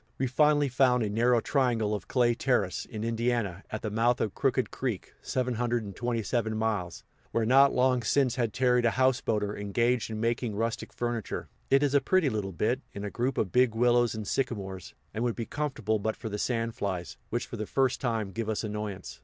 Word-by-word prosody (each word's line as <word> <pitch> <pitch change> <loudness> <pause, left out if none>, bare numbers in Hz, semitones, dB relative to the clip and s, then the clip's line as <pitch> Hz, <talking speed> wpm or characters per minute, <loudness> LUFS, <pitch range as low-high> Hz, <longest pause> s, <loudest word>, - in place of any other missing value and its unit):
We 135 - 0
finally 145 +3 +3
found 125 -2 +3
a 105 - -2
narrow 120 +2 +3
triangle 120 -7 +1
of 105 -3 -4
clay 120 -2 +3
terrace, 115 -7 0
in 110 -3 -6
Indiana, 115 -5 -1
at 110 - -5
the 110 - -2
mouth 115 +3 +2
of 105 - -1
Crooked - - 0
Creek - - -4
(727 120 -2 -1
miles), 105 -6 -2 0.3
where 115 -1 0
not 135 +4 +6
long 125 0 +2
since 130 +2 +2
had 120 -4 0
tarried 125 0 +2
a 115 - -1
houseboater 115 -5 +1
engaged 115 +4 0
in 110 -1 -4
making 115 -1 -1
rustic 115 +2 -2
furniture. 120 -4 -3 0.2
It 135 +1 +4
is 145 -1 +1
a 140 - +5
pretty 165 -1 +2
little 105 -3 -2
bit, 115 +9 0
in 100 - -6
a 100 - -4
group 125 +3 -1
of 95 - 0
big 125 0 +3
willows 120 0 +3
and 110 -2 -5
sycamores, 100 -8 -3 0.2
and 110 - -2
would 120 -2 0
be 115 - -3
comfortable 115 -8 -1
but 110 +2 -1
for 110 - -6
the 105 0 -4
sand 115 -1 -1
flies, 95 -5 -4
which 120 - -2
for 115 - -7
the 110 -1 -4
first 135 -2 +1
time 115 -5 -1
give 110 +2 -3
us 110 - -1
annoyance. 105 -3 -5
115 Hz, 195 wpm, -29 LUFS, 105-125 Hz, 0.3 s, not